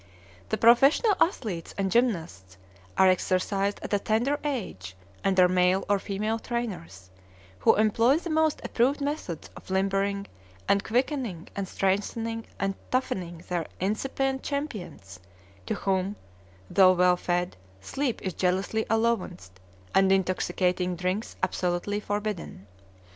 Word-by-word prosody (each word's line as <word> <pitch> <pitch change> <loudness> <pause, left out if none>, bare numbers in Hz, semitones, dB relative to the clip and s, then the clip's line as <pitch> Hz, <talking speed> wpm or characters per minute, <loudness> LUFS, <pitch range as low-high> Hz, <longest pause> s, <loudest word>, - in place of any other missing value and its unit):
The - - 0
professional 275 - +5
athletes 210 - -1
and 195 -1 0
gymnasts 160 - 0 0.4
are 190 - +6
exercised 195 +2 +1
at - - -4
a 205 - +3
tender 240 +8 0
age 185 - -4 0.3
under 190 -2 +5
male 180 +1 +2
or 205 0 +2
female 215 +4 -2
trainers, 140 - -5 0.5
who - - +5
employ 230 +6 +3
the 340 0 -5
most 315 -1 +2
approved 260 +5 +1
methods 285 - -4
of - - -13
limbering 195 +1 0 0.4
and 200 0 +3
quickening 240 - -1
and 195 -1 -3
strengthening 225 +5 -1
and 195 0 0 0.2
toughening 175 -9 -2
their 175 -3 -2
incipient 265 +7 -1
champions, 195 - -5 0.5
to - - -1
whom, 190 +1 -1 0.5
though 185 - +6
well 180 0 +4
fed, 175 0 -1 0.2
sleep 255 - -3
is 185 - -2
jealously 190 +5 0
allowanced 200 - -1 0.3
and 190 0 +4
intoxicating 180 -1 +1
drinks 185 +5 -2
absolutely 180 +3 -1
forbidden. 205 - -4
195 Hz, 120 wpm, -27 LUFS, 180-230 Hz, 0.5 s, are